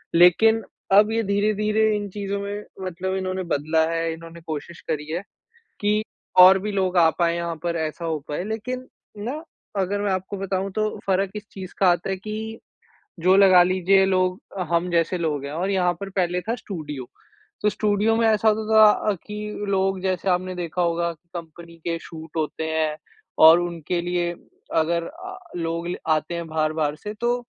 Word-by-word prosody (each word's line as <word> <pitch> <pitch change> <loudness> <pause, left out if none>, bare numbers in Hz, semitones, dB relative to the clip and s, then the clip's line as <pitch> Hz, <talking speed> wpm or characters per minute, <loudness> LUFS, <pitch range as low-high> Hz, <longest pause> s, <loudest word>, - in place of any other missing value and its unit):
लेकिन 220 +6 +6 0.3
अब 210 +2 +6
ये 225 0 +1
धीरे-धीरे 210 +2 +1
इन 205 -1 -3
चीज़ों 200 0 -3
में 205 +1 -5 0.2
मतलब 185 +1 -3
इन्होंने 185 0 -2
बदला 160 0 +1
है, 165 0 -1
इन्होंने 165 +1 -11
कोशिश 160 +1 -6
करी 150 -2 -2
है 175 +3 -2 0.6
कि 210 +1 +2 0.4
और 190 +1 +9
भी 210 +2 -4
लोग 190 -2 0
आ 165 -2 +6
पाएंँ 170 -1 +2
यहाँ 170 -1 -3
पर 170 -1 -1
ऐसा 160 +1 -3
हो 160 -2 -1
पाए। 150 +4 -2
लेकिन 240 +4 -4 0.4
ना 295 +7 -4 0.4
अगर 200 +2 -1
मैं 205 - 0
आपको 190 +2 -3
बताऊँ 195 0 -2
तो 215 +2 0 0.2
फ़र्क 190 0 +1
इस 210 0 -7
चीज़ 190 -2 -8
का 190 - +5
आता 175 +2 0
है 190 - -1
कि 215 +3 -6 0.6
जो 185 +3 +4
लगा 185 -2 +7
लीजिए 190 +1 +3
लोग 185 0 +1 0.3
हम 170 +1 +1
जैसे 170 +2 +1
लोग 150 -4 -2
हैं 140 - -5
और 180 +5 -2
यहाँ 180 -2 +2
पर 200 -1 -5
पहले 180 -2 0
था 230 +4 -2
स्टूडियो। 150 - -6 0.6
तो 210 - +3
स्टूडियो 210 +1 +1
में 225 0 +3
ऐसा 220 0 +3
होता 215 0 +5 0.2
था - - +3
कि 210 0 -5
लोग 190 -1 +1
जैसे 190 0 -1
आपने 185 0 0
देखा 175 0 -3
होगा 170 0 +1
की 170 +2 -29
कंपनी 170 0 -9
के 165 - 0
शूट 160 -1 -10
होते 155 0 -2
हैं 155 -1 0 0.5
और 165 +2 +9
उनके 170 0 -2
लिए 175 0 -1 0.4
अगर 165 +1 +2
अ, 375 +4 -9 0.2
लोग 170 0 -2 0.2
आते 155 +2 +1
हैं 170 -1 -4
बाहर-बाहर 155 -1 0
से 210 +6 -7
तो 240 +1 +2
185 Hz, 180 wpm, -23 LUFS, 170-205 Hz, 0.6 s, और